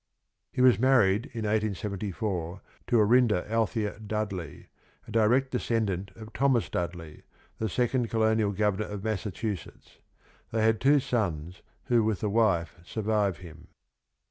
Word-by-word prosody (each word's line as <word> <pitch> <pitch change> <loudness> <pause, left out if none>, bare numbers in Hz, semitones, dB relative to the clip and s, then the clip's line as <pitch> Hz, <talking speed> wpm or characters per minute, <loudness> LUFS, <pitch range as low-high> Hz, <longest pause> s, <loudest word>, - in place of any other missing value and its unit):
He - - -1
was 125 -3 +6
married 120 -5 +3
in 115 - -5
1874 100 -3 -2 0.3
to 120 - +3
Orinda 110 -3 +3
Althea 110 -1 -1
Dudley, 105 -6 -5 0.4
a - - -9
direct 120 +5 +3
descendant 105 -6 -1
of 110 0 -11
Thomas 135 -4 +2
Dudley, 85 -3 -5 0.4
the 110 - -1
second 120 +2 0
colonial 110 -2 +2
governor 105 +1 0
of 105 -1 -6
Massachusetts. 105 -2 -5 0.5
They 110 -1 0
had 110 -1 +2
two 145 +2 +5
sons 90 - -2 0.2
who 120 -2 +2
with 110 -3 -1
the 105 - -1
wife 95 -7 +1
survive 105 -1 -1
him. 80 +1 -13
110 Hz, 130 wpm, -28 LUFS, 95-115 Hz, 0.5 s, was